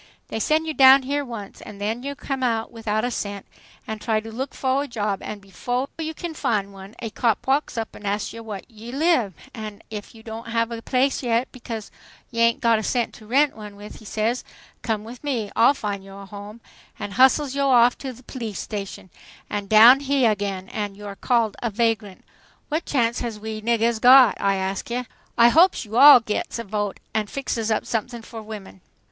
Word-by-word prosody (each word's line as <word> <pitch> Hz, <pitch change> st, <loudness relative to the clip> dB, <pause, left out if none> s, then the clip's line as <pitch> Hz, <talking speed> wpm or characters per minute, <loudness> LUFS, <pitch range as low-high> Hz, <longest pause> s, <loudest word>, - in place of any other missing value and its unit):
"They -, -, -3 dB
sen' 310 Hz, +7 st, +1 dB
yo' 315 Hz, -, -2 dB
down 270 Hz, -1 st, +7 dB
here 285 Hz, +2 st, -1 dB
once, 230 Hz, -6 st, -8 dB
an' 210 Hz, -, -10 dB
then 215 Hz, +4 st, -2 dB
yo' 280 Hz, +2 st, -5 dB
come 270 Hz, -1 st, -4 dB
out 225 Hz, -3 st, 0 dB
without 220 Hz, -1 st, -2 dB
a 245 Hz, -, -2 dB
cent, 200 Hz, -3 st, -4 dB, 0.4 s
and 220 Hz, -1 st, -6 dB
try 220 Hz, -3 st, +1 dB
to 225 Hz, +1 st, -9 dB
look 260 Hz, +5 st, -5 dB
fo' 265 Hz, 0 st, +1 dB
a 285 Hz, -, -2 dB
job, 210 Hz, -5 st, -2 dB
an' 210 Hz, -, -6 dB
befo' 245 Hz, +7 st, -3 dB
yo' 320 Hz, 0 st, -3 dB
can 340 Hz, 0 st, -5 dB
fin' 205 Hz, -9 st, -1 dB
one 195 Hz, +2 st, -12 dB
a 225 Hz, -, -4 dB
cop 230 Hz, -1 st, 0 dB
walks 275 Hz, -1 st, 0 dB
up 225 Hz, -1 st, -4 dB
an' -, -, -12 dB
asks 205 Hz, +1 st, -2 dB
yo' 230 Hz, -, -8 dB
whah 210 Hz, -4 st, -6 dB
yo' 235 Hz, +2 st, -9 dB
live, 285 Hz, -, +2 dB, 0.2 s
an' 215 Hz, -4 st, -8 dB
ef 210 Hz, +1 st, -7 dB
yo' 220 Hz, -, -14 dB, 0.2 s
haven't 230 Hz, 0 st, -2 dB
got -, -, -7 dB
a -, -, -12 dB
place 265 Hz, +3 st, +1 dB
yet, 240 Hz, 0 st, 0 dB
becaus' 230 Hz, -4 st, -7 dB, 0.4 s
yo' 230 Hz, -1 st, -1 dB
ain' 230 Hz, 0 st, +4 dB
got 230 Hz, -2 st, +3 dB
a -, -, -4 dB
cent 240 Hz, +1 st, -1 dB
to 215 Hz, -, -14 dB
ren' 275 Hz, +5 st, +3 dB
one 210 Hz, -2 st, -10 dB
with, 205 Hz, +1 st, -11 dB
he 220 Hz, -, -15 dB
says, 220 Hz, +4 st, -1 dB, 0.4 s
'Come 220 Hz, -3 st, -2 dB
with 235 Hz, +4 st, -11 dB
me, 240 Hz, -8 st, -2 dB
I'll 240 Hz, +5 st, +5 dB
fin' 205 Hz, -5 st, -4 dB
yo' 195 Hz, 0 st, -12 dB
a -, -, -9 dB
home,' 205 Hz, +3 st, -10 dB, 0.4 s
an' 205 Hz, -, -5 dB
hustles 265 Hz, +5 st, +4 dB
yo' 280 Hz, 0 st, +1 dB
off 245 Hz, -1 st, +5 dB
to 270 Hz, -, -5 dB
the 250 Hz, +1 st, -15 dB
p'lice 230 Hz, -6 st, -6 dB
station 195 Hz, -3 st, -6 dB, 0.4 s
an' 205 Hz, -1 st, -3 dB
down 225 Hz, +6 st, +8 dB
heah 275 Hz, -4 st, +2 dB
again, 195 Hz, -2 st, -3 dB
an' 205 Hz, -2 st, -4 dB
you're 205 Hz, -1 st, -8 dB
called 230 Hz, -1 st, +1 dB
a 235 Hz, -, 0 dB
4vag' 205 Hz, -, -15 dB
(vagrant). 225 Hz, -4 st, -1 dB, 0.4 s
What 310 Hz, +3 st, -1 dB
chance 235 Hz, -4 st, +1 dB
has 230 Hz, -3 st, -4 dB
we 215 Hz, 0 st, -5 dB
niggahs 230 Hz, 0 st, +1 dB
got, 255 Hz, -2 st, +8 dB
I 195 Hz, 0 st, +2 dB
ask 190 Hz, +2 st, -3 dB
ya? 245 Hz, +1 st, -2 dB, 0.3 s
I 235 Hz, 0 st, +7 dB
hopes 330 Hz, 0 st, +4 dB
yo' 210 Hz, -, -13 dB
all 285 Hz, -2 st, +10 dB
gits 215 Hz, +1 st, -3 dB
a 230 Hz, -, -4 dB
vote 205 Hz, -1 st, -3 dB
an' 215 Hz, -1 st, 0 dB
fixes 230 Hz, -3 st, -3 dB
up 220 Hz, -, 0 dB
somethings 235 Hz, 0 st, -3 dB
for 225 Hz, -2 st, -8 dB
women!" 210 Hz, -3 st, -10 dB
230 Hz, 215 wpm, -23 LUFS, 210-255 Hz, 0.4 s, all